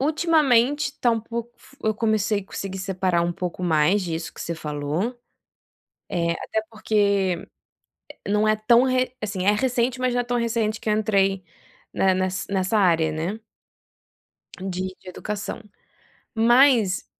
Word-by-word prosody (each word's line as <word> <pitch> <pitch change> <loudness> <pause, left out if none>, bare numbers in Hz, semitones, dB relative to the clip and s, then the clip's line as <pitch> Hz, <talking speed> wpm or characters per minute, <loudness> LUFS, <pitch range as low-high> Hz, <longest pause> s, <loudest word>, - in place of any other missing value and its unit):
ultimamente 295 -3 +3
está 245 -3 0
um 225 -1 0
pouco 235 +1 -6
f 275 - -20
eu 220 - +2
comecei 215 -2 0
conseguir 190 -1 -6
separar 185 -2 0
um 175 0 0
pouco 180 +1 -5
mais 165 +4 +3
disso 165 -2 -4
que - - -12
você 170 - -3
falou, 155 - -3 0.9
eh, 170 -2 0
até 220 - -2
porque 200 -4 0 0.8
não 210 +1 +2
é 215 0 +3
tão 235 +3 +4
re 255 -1 0
assim 200 -3 -3
é 205 - +6
recente, 250 +2 0
mas 255 -1 +1
não 245 - +1
é - - -4
tão 245 0 -1
recente 225 -2 -1
que 215 - -1
entrei 195 -3 +1 0.5
na 195 - +1
na 190 - +5
ness 185 0 -3
nessa 190 +2 0
área, 165 -5 +3
né 175 +8 -3 1.2
de 185 0 -4
de 185 - -13
educação, 210 +3 -5 0.7
mas, 235 -3 +4
210 Hz, 150 wpm, -23 LUFS, 185-235 Hz, 1.2 s, é